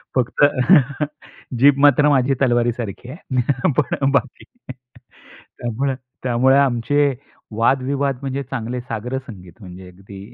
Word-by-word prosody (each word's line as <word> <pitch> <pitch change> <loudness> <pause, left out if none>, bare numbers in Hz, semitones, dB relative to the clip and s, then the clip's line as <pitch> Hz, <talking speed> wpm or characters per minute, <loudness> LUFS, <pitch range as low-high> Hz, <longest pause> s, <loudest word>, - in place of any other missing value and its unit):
फक्त 130 +2 0 1.2
जीभ 140 +1 +5
मात्र 145 +1 +5
माझी 135 -1 +2
तलवारीसारखी 120 -2 -1
आहे. 130 -2 -2
पण 135 0 0
बाकी 140 -2 -2 1.1
त्यामुळे 130 +3 -2 0.3
त्यामुळे 130 +2 +3
आमचे 140 +2 +1 0.4
वादविवाद 135 +2 0
म्हणजे 135 0 -4
चांगले 125 -1 -5
साग्रसंगीत 115 -4 -7
म्हणजे 90 0 -11
अगदी 95 +2 -13
125 Hz, 100 wpm, -20 LUFS, 120-135 Hz, 1.2 s, जीभ